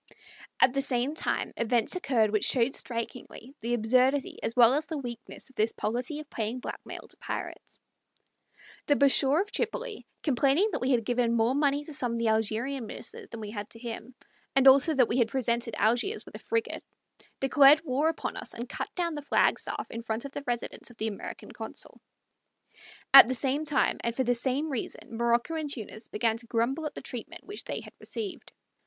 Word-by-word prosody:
At 255 - +5
the 275 - +1
same 265 +1 0
time 315 - -1
events 235 - +2
occurred 240 - +2
which 215 -1 +1
showed 255 +1 +2
strikingly 240 +1 -5
the 235 +2 -1
absurdity 255 +5 +2
as 225 - -2
well 240 0 +7
as 300 +2 0
the 315 - -3
weakness 240 -4 -8
of 265 - -21
this 220 +2 +1
policy 245 +7 -2
of 305 - -9
paying 230 -1 -3
blackmail - - -8
to - - -12
pirates. - - -6 1.1
The 290 - +4
Bashaw 280 +2 +4
of 415 - -17
Tripoli, 475 0 -3 0.2
complaining 285 - +3
that 315 - -3
we 255 - 0
had 240 -4 +2
given 240 -1 +1
more 230 +2 +3
money 285 0 +1
to 310 - -8
some 245 -4 -1
of - - -1
the 230 -1 +1
Algerian 225 +4 0
ministers - - -7
than 230 - -7
we 210 -1 -6
had 205 -2 -6
to - - -11
him, 235 +1 -7 0.4
and 270 0 +5
also 275 +4 +7
that 255 -3 +5
we 245 - 0
had 235 - +4
presented 235 -2 -1
Algiers 245 - +1
with - - -13
a - - -7
frigate, 455 0 -2 0.6
declared 285 +3 +6
war 285 +3 +2
upon 325 - -4
us, - - -7
and 240 +2 -5
cut - - -4
down 345 -2 -1
the 295 - -5
flag 285 - +2
staff - - -4
in 230 - -5
front 225 +2 -3
of 280 - -6
the 285 - -5
residence 240 0 -3
of 240 - -16
the 220 +1 -1
American 205 - -8
consul. - - -6 1.1
At 275 - +12
the 255 - -1
same 275 +4 -1
time, 295 -3 +1
and 235 0 -1
for 260 - +1
the 245 0 +2
same 265 +5 -1
reason, 230 -2 -5
Morocco 235 +6 +1
and 310 -3 -2
Tunis 220 -3 -6
began 225 +1 0
to 235 0 -11
grumble 260 +8 0
at 295 - -9
the - - -7
treatment 260 +8 -6
which 410 +1 -7
they - - -4
had - - -13
received. 410 -5 -6
255 Hz, 200 wpm, -28 LUFS, 230-285 Hz, 1.1 s, At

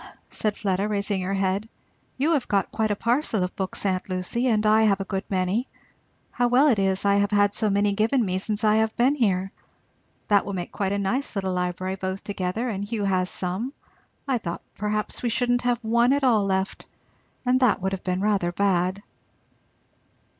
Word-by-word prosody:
said 210 -1 -1
Fleda 195 -1 0
raising 200 -2 -1
her 190 +2 -2
head, 195 +3 -1 0.5
"you 290 +5 +1
have 280 -6 0
got 200 -1 0
quite 220 -1 0
a 205 - +1
parcel 230 -2 0
of 180 - -4
books, 190 +1 -3
aunt 185 0 -1
Lucy, 185 +7 -1
and 220 -3 +2
I 215 +1 +5
have 205 -3 +3
a - - -1
good 195 0 -3
many 190 +6 0 0.6
how 245 0 +1
well 260 +5 +5
it 225 -6 +2
is 195 0 +1
I 200 0 +4
have 200 0 +2
had 205 -1 +3
so 215 0 +1
many 200 0 +2
given 225 +4 +2
me 185 -1 -1
since 210 +2 -2
I 215 0 +4
have 220 0 0
been 255 +4 +4
here! 195 -8 0 0.8
That 205 -1 +4
will 200 - -5
make 180 -2 -4
quite 195 -2 -2
a 200 - 0
nice 230 +7 -1
little 190 -2 -1
library, 180 +1 -2
both 190 0 -4
together, 200 +4 -2
and 200 -4 -3
Hugh 210 0 -3
has 185 -2 +1
some; 190 +9 -3 0.5
I 260 -3 +1
thought 170 -5 -5
perhaps 210 0 -2
we 240 - 0
shouldn't 245 +1 +1
have 245 -1 +1
one 235 +3 +3
at 285 0 0
all 225 -6 +4
left, 190 0 -2 0.6
and 250 +1 +3
that 250 -5 +3
would 190 0 -2
have 190 -1 -4
been 185 0 -1
rather 200 -4 +1
bad." 185 +1 0
205 Hz, 200 wpm, -25 LUFS, 190-230 Hz, 0.8 s, I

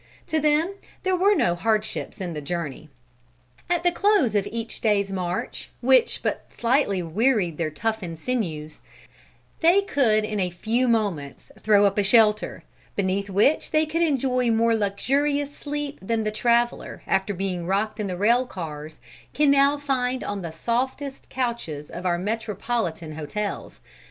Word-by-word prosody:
To 315 - 0
them 305 +5 +2 0.3
there 375 -1 +2
were 395 +3 +4
no 240 - +2
hardships 215 +4 -1
in 180 -3 -4
the 150 - -5
journey. 155 -1 -4 0.8
At 350 -1 +1
the 350 - +4
close 395 - +3
of 205 -1 +1
each 230 +1 -5
day's 200 -3 +2
march, 180 -2 -3
which 260 +1 +3
but - - -3
slightly 230 -6 +1
wearied 185 - +1
their 160 -2 0
toughened 190 -1 -3
sinews, 160 -9 -3 0.8
they 350 +5 +5
could 230 - +2
in 215 -1 -3
a 180 -2 +1
few 225 +8 0
moments 200 - -1
throw 205 -1 +4
up 200 +1 +2
a - - +3
shelter, 215 +1 +3 0.3
beneath 200 +1 -1
which 205 +10 +2
they 310 0 +3
would 310 0 -7
enjoy 260 -6 +1
more 230 +1 +3
luxurious 280 +8 0
sleep 290 -1 -5
than 220 +3 -1
the 215 - -1
traveler, 235 +2 0
after 190 +1 +1
being 180 -2 -3
rocked 210 +3 0
in 210 - -1
the 180 -2 -4
rail 235 +6 +3
cars, 155 -6 -7 0.3
can 295 -1 +4
now 280 +1 +4
find 260 -3 -1
on 205 -1 -3
the 170 - -5
softest 260 - -3
couches 235 - -3
of 180 +1 -4
our 175 -1 +2
metropolitan 210 -4 -3
hotels. 195 +7 -5
215 Hz, 155 wpm, -24 LUFS, 185-265 Hz, 0.8 s, they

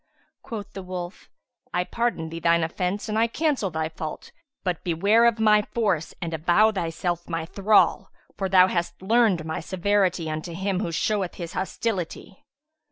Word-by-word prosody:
'" - - -44
Quoth 210 -6 -7
the 195 - -6
wolf, 180 -1 -7 0.5
"I 180 - +2
pardon 230 -5 -2
thine 170 0 +2
offence 180 +6 -2
and 215 0 0
I 230 - +4
cancel 280 -5 0
thy 160 -1 -2
fault; 155 -1 -7 0.3
but 180 -3 -2
beware 200 +7 +3
of 235 -1 +3
my 210 -1 +5
force 205 -7 -1
and 165 -2 -4
avow 175 +7 +4
thyself 175 -2 -3
my 165 -1 -2
thrall; 200 +5 +3 0.3
for 195 -1 -2
thou 185 -1 +7
hast 170 -1 -2
learned 210 -6 +3
my 160 - -3
severity 185 -1 0
unto 155 +2 -4
him 190 +1 -1
who 175 -4 -2
showeth 195 +1 -1
his 170 -2 -6
hostility!" 195 - -4
185 Hz, 165 wpm, -25 LUFS, 170-210 Hz, 0.5 s, thou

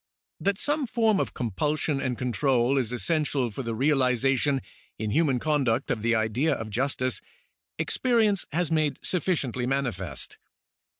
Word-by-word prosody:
That 195 +4 0
some 290 +1 0
form 225 -3 +2
of - - -2
compulsion 140 - -1
and 125 -3 -2
control 125 0 +1
is 120 -3 -2
essential 130 - 0
for 105 - -5
the 115 -3 -3
realization 135 0 +2 0.3
in 110 -1 -3
human 145 -1 +2
conduct 135 -3 0
of 115 -3 -1
the 115 +1 +2
idea 110 +8 +1
of 110 -1 -6
justice, 130 -2 0 0.6
experience 220 -6 +2
has 170 +1 0
made 155 -2 +1
sufficiently 145 -9 0
manifest. 115 - -2
135 Hz, 135 wpm, -26 LUFS, 120-155 Hz, 0.6 s, form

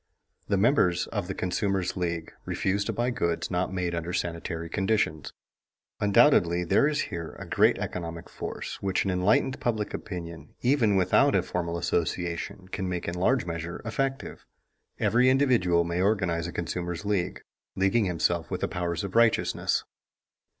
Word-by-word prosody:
The 100 - +1
members 95 -5 +3
of - - -4
The - - -4
Consumers' 95 0 -1
League 85 -3 -3
refuse 100 +2 0
to - - -1
buy 120 +1 0
goods 85 -8 -1
not 90 +1 0
made 90 -2 -2
under 85 +1 -3
sanitary 85 -1 -3
conditions. 95 -5 0 0.7
Undoubtedly 100 - +4
there 115 - +3
is 150 -1 0
here 85 -2 -5
a - - -7
great - - +3
economic 85 -1 -5
force - - -6
which 95 -1 0
an 95 - +1
enlightened 105 +9 +2
public 110 -3 -1
opinion, 85 -6 -7
even 120 -5 +3
without 95 -2 +4
a - - +3
formal 85 -1 -3
association, 85 +2 -2
can 95 0 -3
make 90 -1 -3
in 85 - -2
large 100 +6 +1
measure 85 0 -5
effective. 135 +4 -3 0.6
Every 125 +2 +4
individual 120 -11 +3
may 85 +1 -1
organize 95 -5 +1
a - - -5
consumer's 85 +1 -4
league, 100 -4 -1 0.3
leaguing 95 +4 +2
himself 85 -3 0
with - - -3
the - - +1
powers 85 -1 -2
of 100 0 -6
righteousness. 115 -1 +2
90 Hz, 155 wpm, -27 LUFS, 85-105 Hz, 0.7 s, Undoubtedly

